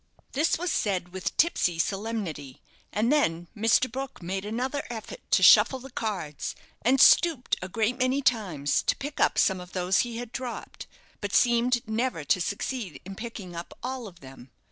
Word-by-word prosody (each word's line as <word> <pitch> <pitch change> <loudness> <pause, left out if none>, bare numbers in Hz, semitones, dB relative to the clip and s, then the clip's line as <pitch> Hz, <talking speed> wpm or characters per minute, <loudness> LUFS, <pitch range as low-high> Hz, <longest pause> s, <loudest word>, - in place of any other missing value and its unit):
This 300 +4 +1
was 350 0 -2
said 185 - -1
with 190 +2 -4
tipsy 185 - +2
solemnity; 190 - -3 0.3
and 225 +6 +1
then 175 - +1
Mr. 225 +4 +3
Brook 265 +2 -6
made 190 +3 -3
another 255 +6 -2
effort 225 -3 -7
to - - +3
shuffle 265 - +7
the 260 +1 -11
cards, 190 - -4 0.3
and 260 +4 +3
stooped 320 -5 +5
a 185 - -5
great 230 +5 0
many 255 +2 +1
times 180 - +1
to - - +1
pick 290 +1 -7
up - - +3
some 190 -2 +3
of 180 0 -12
those 180 0 +1
he 235 -2 -1
had 240 -1 -6
dropped, 250 -2 -6 0.3
but 205 -1 -2
seemed 240 0 +3
never 220 -6 -1
to 180 +6 +2
succeed 205 - -3
in 195 - -7
picking 200 -5 -8
up 170 +1 -8
all 255 -2 -4
of 175 -3 -14
them. 130 -1 -13
220 Hz, 175 wpm, -27 LUFS, 180-255 Hz, 0.3 s, shuffle